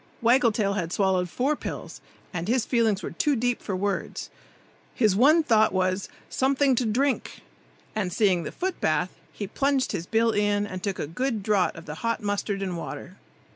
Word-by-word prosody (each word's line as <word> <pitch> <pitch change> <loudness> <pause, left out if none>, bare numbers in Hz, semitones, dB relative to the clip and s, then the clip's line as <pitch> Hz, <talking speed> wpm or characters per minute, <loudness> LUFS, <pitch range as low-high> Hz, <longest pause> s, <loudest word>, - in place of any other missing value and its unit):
Waggle 240 +1 +4
tail 205 -2 0
had 175 -4 -2
swallowed 185 -2 +1
four 270 - 0
pills, - - -7 0.3
and 170 0 -3
his 240 0 +2
feelings 225 -5 +1
were - - -4
too 295 -2 +1
deep 245 0 0
for 195 - -3
words. 200 +1 -3 0.6
His 215 -6 +3
one 300 +9 +5
thought 220 -6 +4
was 185 +1 0 0.2
"something 270 +1 +2
to 245 -1 +1
drink!" 265 +5 0 0.5
and 195 -4 -1
seeing 185 -3 +2
the - - -5
foot 375 +1 -3
bath, 170 +3 +1 0.2
he 205 - -5
plunged 270 +5 0
his 170 - -4
bill 225 +1 +3
in 205 -1 +1
and 185 -2 -6
took 195 -1 -2
a - - -2
good 220 - -2
draught 200 -3 +2
of 165 - -10
the 150 - -6
hot 230 0 0
mustard 205 -1 -2
and 185 -2 -3
water. 185 +3 -7
210 Hz, 185 wpm, -26 LUFS, 190-245 Hz, 0.6 s, one